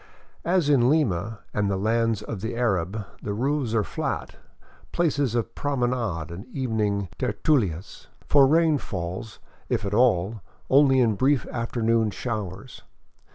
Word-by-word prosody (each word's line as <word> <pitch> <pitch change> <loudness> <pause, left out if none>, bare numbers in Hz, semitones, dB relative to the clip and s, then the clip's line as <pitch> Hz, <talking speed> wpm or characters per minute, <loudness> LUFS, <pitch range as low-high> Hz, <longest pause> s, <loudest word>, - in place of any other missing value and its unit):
As 175 -3 +2
in 130 -4 +4
Lima 110 - 0
and 105 -1 0
the 95 - 0
lands 110 +1 +1
of 105 -2 -6
the 115 +2 -3
Arab, 105 -3 -1 0.2
the 100 - -3
roofs 130 -1 0
are 110 - +3
flat, - - -4 0.6
places 145 -8 +1
of 115 -1 -1
promenade 120 - -1
and 95 +7 -8
evening 110 -7 -1
tertiilias; 100 - -1 0.2
for 140 -2 +6
rain 160 0 +3
falls, 95 +3 -5 0.3
if - - 0
at 100 - -3
all, 110 -3 +2 0.3
only 135 -1 +5
in 115 -3 +3
brief 130 +5 +2
afternoon 115 -1 0
showers. 105 0 -5
115 Hz, 135 wpm, -25 LUFS, 100-130 Hz, 0.6 s, for